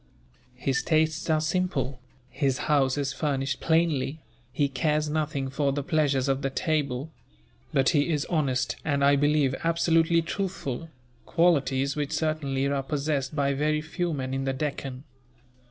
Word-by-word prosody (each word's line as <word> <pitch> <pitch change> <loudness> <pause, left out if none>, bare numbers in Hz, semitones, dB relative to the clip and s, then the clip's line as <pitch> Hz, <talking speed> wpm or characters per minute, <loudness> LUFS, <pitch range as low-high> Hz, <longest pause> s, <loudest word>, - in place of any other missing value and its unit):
His 135 +1 0
tastes 160 0 +1
are 155 -1 +3
simple, 155 -6 -1 0.3
his 135 0 0
house 140 -2 +2
is 140 -1 -1
furnished 135 -2 -1
plainly, 160 -3 +1 0.3
he 145 +2 +1
cares 150 +2 0
nothing 150 -3 -1
for 140 +1 0
the 140 +1 -2
pleasures 145 -4 +1
of 135 0 +1
the 135 - 0
table; 145 -2 -1 0.6
but 135 -1 +3
he 145 +1 +2
is 150 -2 0
honest 140 -7 0
and, 140 -2 +1
I 140 0 +6
believe, 145 -1 +2
absolutely 165 0 +3
truthful 165 -5 -4 0.4
qualities 140 -5 +2
which 145 -2 -2
certainly 145 -4 0
are 140 0 0
possessed 140 0 -2
by 140 -1 +1
very 150 +2 +1
few 170 +3 -3
men 130 -3 -3
in 135 0 -2
the 135 - 0
Deccan. 135 -2 -4
145 Hz, 150 wpm, -27 LUFS, 135-155 Hz, 0.6 s, I